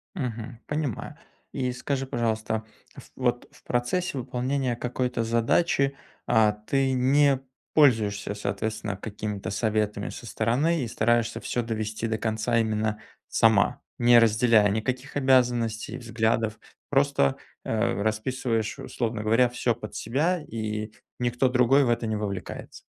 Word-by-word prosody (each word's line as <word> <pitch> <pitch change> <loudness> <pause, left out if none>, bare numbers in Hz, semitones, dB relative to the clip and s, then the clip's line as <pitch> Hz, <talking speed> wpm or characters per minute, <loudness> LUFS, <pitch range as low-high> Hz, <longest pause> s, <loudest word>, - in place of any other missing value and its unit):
Мгм. 120 - -5
Понимаю. 150 -7 -3 0.4
И 125 -2 -1
скажи, 135 +2 -2
пожалуйста, 110 -3 -1 0.3
ф - - -13
вот 120 -1 -1
в - - -21
процессе 135 +7 -1
выполнения 125 +1 -1
какой-то 125 0 -2
задачи, 135 +5 +2 0.3
а, 110 -1 +4
ты 130 +6 0
не 135 +2 +4 0.3
пользуешься, 110 -9 +3
соответственно, 110 0 -3
какими-то 105 -1 -5
советами 105 0 -1
со - - -9
стороны 130 +9 +1
и 120 - -3
стараешься 120 +1 +1
всё 120 - -2
довести 110 0 -3
до 110 -1 -1
конца 110 +1 0
именно 110 -1 0 0.3
сама, 110 -3 +3 0.2
не 120 0 +6
разделяя 110 -1 +4
никаких 125 +6 -2
обязанностей, 125 -4 +2
взглядов, 115 -2 0 0.3
просто, 135 - +2 0.3
э, 110 -3 0
расписываешь, 110 +2 -1
условно 115 -4 -3
говоря, 115 +3 +4
всё 120 -1 0
под 105 -2 -9
себя, 150 +8 0
и 110 -2 -4 0.3
никто 125 +1 +1
другой 125 +2 +4
в - - +1
это 120 -1 +1
не 110 - -1
вовлекается? 100 -4 -5
115 Hz, 130 wpm, -26 LUFS, 110-130 Hz, 0.4 s, не